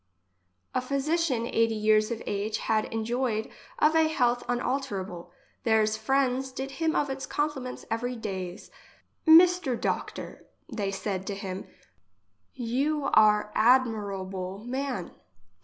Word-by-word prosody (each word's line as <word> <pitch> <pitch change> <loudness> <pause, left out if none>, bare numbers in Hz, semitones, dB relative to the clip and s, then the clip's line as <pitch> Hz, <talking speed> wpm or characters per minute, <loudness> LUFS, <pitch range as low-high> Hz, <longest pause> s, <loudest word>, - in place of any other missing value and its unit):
A 255 - +1
physician 275 -1 0
eighty 230 -1 +1
years 215 0 +3
of 235 -2 -4
age 205 +2 -2
had 215 -1 0
en 225 -1 -2
joicd 235 -2 -1 0.3
of 310 +1 +3
a 320 -1 +5
health 245 -6 +1
unalterable. 240 -8 -3 0.3
Theirs 220 -2 +3
friends 265 +3 0
did 265 +1 -5
him 320 +3 -1
of 285 -2 +1
it 270 0 -5
compliments 290 -4 -3
every 245 +2 -1
days: 190 -4 -6 0.3
" - - -46 0.2
Mister 355 -8 +1
doctor, - - -4 0.2
they 200 -3 -3
said 195 -1 -3
to 200 - -2
him, 190 -1 -6 0.9
you 275 +4 -1
are 210 -1 +5
admirable 200 -5 +1
man. 260 -7 -3
235 Hz, 125 wpm, -28 LUFS, 210-270 Hz, 0.9 s, a